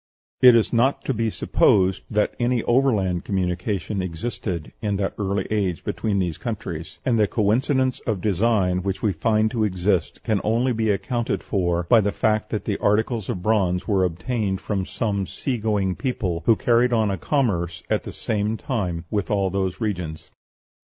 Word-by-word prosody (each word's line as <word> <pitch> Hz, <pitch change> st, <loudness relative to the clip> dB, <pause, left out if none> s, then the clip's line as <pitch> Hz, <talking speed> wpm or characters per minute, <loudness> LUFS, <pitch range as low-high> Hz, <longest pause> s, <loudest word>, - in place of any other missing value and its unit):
It 125 Hz, -2 st, +9 dB
is 115 Hz, +1 st, +2 dB
not 125 Hz, +4 st, +2 dB
to 135 Hz, -, 0 dB
be 115 Hz, -1 st, 0 dB
supposed 95 Hz, -2 st, +2 dB
that 105 Hz, -1 st, +1 dB
any 120 Hz, -1 st, +1 dB
overland 105 Hz, -9 st, +2 dB
communication 95 Hz, 0 st, -2 dB
existed 90 Hz, -1 st, -4 dB
in 105 Hz, -2 st, -1 dB
that 95 Hz, 0 st, -1 dB
early 100 Hz, -1 st, -1 dB
age 95 Hz, -5 st, -1 dB
between 105 Hz, -3 st, -1 dB
these 90 Hz, -5 st, -1 dB
countries; 85 Hz, -9 st, -5 dB
and 120 Hz, -3 st, +2 dB
the 105 Hz, -, +4 dB
coincidence 130 Hz, +6 st, +1 dB
of 110 Hz, -5 st, 0 dB
design 95 Hz, -1 st, +1 dB
which 95 Hz, 0 st, -3 dB
we 105 Hz, -3 st, +2 dB
find 110 Hz, +1 st, +1 dB
to 115 Hz, -3 st, 0 dB
exist 95 Hz, -3 st, 0 dB
can 110 Hz, -4 st, 0 dB
only 120 Hz, +4 st, +1 dB
be 110 Hz, -1 st, 0 dB
accounted 120 Hz, +4 st, -1 dB
for 85 Hz, -4 st, 0 dB
by 110 Hz, +6 st, +5 dB
the 100 Hz, 0 st, 0 dB
fact 110 Hz, +1 st, 0 dB
that 110 Hz, -, -3 dB
the 100 Hz, -, -2 dB
articles 110 Hz, +1 st, +1 dB
of 90 Hz, -, -3 dB
bronze 95 Hz, -4 st, +1 dB
were 100 Hz, -3 st, +2 dB
obtained 95 Hz, +3 st, -1 dB
from 100 Hz, -3 st, -3 dB
some 100 Hz, -5 st, -2 dB
sea 125 Hz, -4 st, -3 dB
going 100 Hz, -4 st, 0 dB
people, 95 Hz, -11 st, -2 dB
who 115 Hz, -, +6 dB
carried 120 Hz, +2 st, +2 dB
on 110 Hz, -3 st, +2 dB
a -, -, 0 dB
commerce 90 Hz, -, -1 dB
at -, -, 0 dB
the -, -, -7 dB
same 105 Hz, 0 st, -2 dB
time 90 Hz, -, -3 dB
with 105 Hz, -3 st, -1 dB
all 100 Hz, -3 st, +1 dB
these 95 Hz, -1 st, -2 dB
regions. 90 Hz, -8 st, -4 dB
105 Hz, 175 wpm, -23 LUFS, 95-115 Hz, -, It